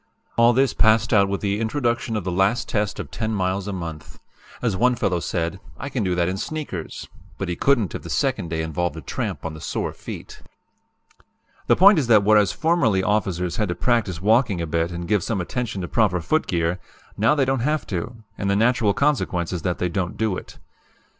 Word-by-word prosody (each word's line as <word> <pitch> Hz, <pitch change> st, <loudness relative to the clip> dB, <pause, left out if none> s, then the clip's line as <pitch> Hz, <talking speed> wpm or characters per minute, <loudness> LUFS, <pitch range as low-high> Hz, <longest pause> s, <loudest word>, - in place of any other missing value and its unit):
"All 115 Hz, 0 st, +6 dB
this 130 Hz, +1 st, +2 dB
passed 110 Hz, 0 st, +3 dB
out 100 Hz, -2 st, +4 dB
with 100 Hz, -, -2 dB
the 100 Hz, 0 st, 0 dB
introduction 120 Hz, 0 st, -1 dB
of 105 Hz, -, -2 dB
the 90 Hz, -, -2 dB
last 95 Hz, +7 st, +1 dB
test 105 Hz, -1 st, -1 dB
of -, -, -6 dB
10 110 Hz, -1 st, -2 dB
miles 95 Hz, 0 st, -1 dB
a -, -, -2 dB
month. 85 Hz, -5 st, -7 dB, 0.4 s
As 115 Hz, -6 st, 0 dB
one 125 Hz, +5 st, +3 dB
fellow 90 Hz, -7 st, 0 dB
said: 85 Hz, +2 st, -2 dB, 0.2 s
'I 140 Hz, -, -5 dB
can 130 Hz, -5 st, -2 dB
do 90 Hz, -2 st, 0 dB
that 85 Hz, -1 st, +1 dB
in 95 Hz, +1 st, -2 dB
sneakers' 145 Hz, -, -5 dB, 0.3 s
but 95 Hz, -, -3 dB
he 85 Hz, -, -1 dB
couldn't 120 Hz, -3 st, +2 dB
if -, -, -5 dB
the -, -, -9 dB
second 85 Hz, -, 0 dB
day 80 Hz, 0 st, -2 dB
involved 80 Hz, +1 st, -2 dB
a -, -, -6 dB
tramp 70 Hz, -, -4 dB
on 80 Hz, -, -3 dB
the 80 Hz, -, -10 dB
sore -, -, -3 dB
feet. -, -, -9 dB, 1.3 s
"The -, -, +5 dB
point 195 Hz, -1 st, +7 dB
is 135 Hz, -, -1 dB
that 110 Hz, -4 st, +6 dB
whereas 105 Hz, -1 st, +4 dB
formerly 155 Hz, -, +2 dB
officers 95 Hz, -4 st, 0 dB
had 105 Hz, -4 st, 0 dB
to 85 Hz, -, -1 dB
practice 105 Hz, -3 st, 0 dB
walking 105 Hz, 0 st, +2 dB
a 85 Hz, -, -1 dB
bit 85 Hz, +2 st, -1 dB
and 85 Hz, 0 st, -5 dB
give 105 Hz, 0 st, +2 dB
some 110 Hz, -4 st, -1 dB
attention 105 Hz, +2 st, -3 dB
to 90 Hz, -, -4 dB
proper 100 Hz, -5 st, +2 dB
footgear, 85 Hz, -, 0 dB, 0.4 s
now 115 Hz, +8 st, +3 dB
they 140 Hz, -3 st, +2 dB
don't 135 Hz, 0 st, 0 dB
have 150 Hz, +5 st, 0 dB
to, 105 Hz, +5 st, -5 dB, 0.2 s
and 100 Hz, -, -1 dB
the 100 Hz, -, +2 dB
natural 115 Hz, -1 st, +2 dB
consequence 110 Hz, -, 0 dB
is 90 Hz, -, -3 dB
that 90 Hz, +2 st, -1 dB
they 90 Hz, -, 0 dB
don't 90 Hz, +1 st, -3 dB
do 110 Hz, -4 st, 0 dB
it. -, -, -9 dB
100 Hz, 210 wpm, -23 LUFS, 90-115 Hz, 1.3 s, point